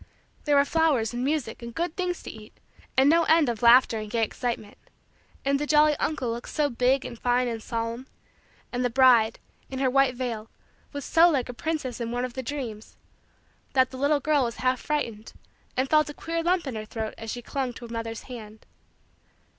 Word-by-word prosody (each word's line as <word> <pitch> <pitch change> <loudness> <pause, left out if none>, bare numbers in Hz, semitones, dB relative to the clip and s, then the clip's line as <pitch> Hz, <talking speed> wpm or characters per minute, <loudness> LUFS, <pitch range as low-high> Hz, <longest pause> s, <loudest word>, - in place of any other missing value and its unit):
There 295 -1 +3
were 280 0 +5
flowers 285 -8 +1
and 240 +1 -2
music 275 -6 -2
and 235 0 -8
good 340 0 -2
things 360 -1 -2
to - - -7
eat 215 0 -14 0.4
and 265 +1 +6
no 330 +3 +5
end 320 -4 +4
of 230 -2 -3
laughter 235 -1 +6
and 215 -1 -6
gay 230 0 0
excitement; 225 -2 -4 0.7
and 275 0 +2
the 295 - -2
jolly 300 0 +5
uncle 275 -8 -1
looked 235 +1 -6
so 295 -2 0
big 250 +3 +2
and 235 - -7
fine 245 0 +1
and 230 -2 -4
solemn; 230 +3 -4 0.6
and 245 0 -1
the 245 - +2
bride, 240 -3 +5 0.3
in 265 - -5
her 260 -1 +1
white 275 -1 +3
veil, 235 -3 -4 0.4
was 285 -2 -6
so 335 +1 +5
like 265 -6 0
a - - -4
princess 295 -4 -3
in 230 - -2
one 245 +1 -1
of 250 - -7
the 260 - -4
dreams; 235 -5 -6 0.8
that 260 -2 +3
the 260 - -8
little 285 +2 +2
girl 295 -2 +2
was 235 -1 -2
half 255 0 0
frightened 230 -8 -3 0.4
and 260 +1 +2
felt 305 +1 +3
a 295 - -8
queer 330 0 -3
lump 345 0 +1
in 265 - -4
her 215 -1 -4
throat 220 0 -5
as 225 - -7
she 245 +2 -5
clung 265 -1 -2
to 240 - -10
her 235 - -9
mother's 230 0 -5
hand. 220 -4 -10
255 Hz, 210 wpm, -26 LUFS, 230-290 Hz, 0.8 s, and